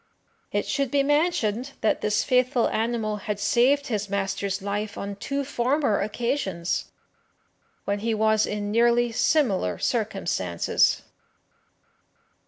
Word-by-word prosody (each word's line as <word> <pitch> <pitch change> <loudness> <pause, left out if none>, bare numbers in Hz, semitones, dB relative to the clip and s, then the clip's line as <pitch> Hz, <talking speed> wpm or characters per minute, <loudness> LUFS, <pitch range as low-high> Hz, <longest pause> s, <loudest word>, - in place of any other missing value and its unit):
It - - 0
should 275 -2 -1
be 280 +1 +2
mentioned 280 -5 +1
that 220 - +1
this 210 0 +1
faithful 250 -1 +2
animal 220 -2 -1
had 205 0 -4
saved 250 +7 +3
his 210 -4 -2
master's 195 0 -2
life 205 +1 -3
on 200 0 -5
two 275 +7 -3
former 255 -3 +1
occasions, 205 -5 -2 1.0
when 200 0 -1
he 225 +1 -1
was 220 0 +2
in 205 0 -3
nearly 235 +1 +3
similar 225 - +1
circumstances. 195 - 0
220 Hz, 115 wpm, -25 LUFS, 200-250 Hz, 1.0 s, saved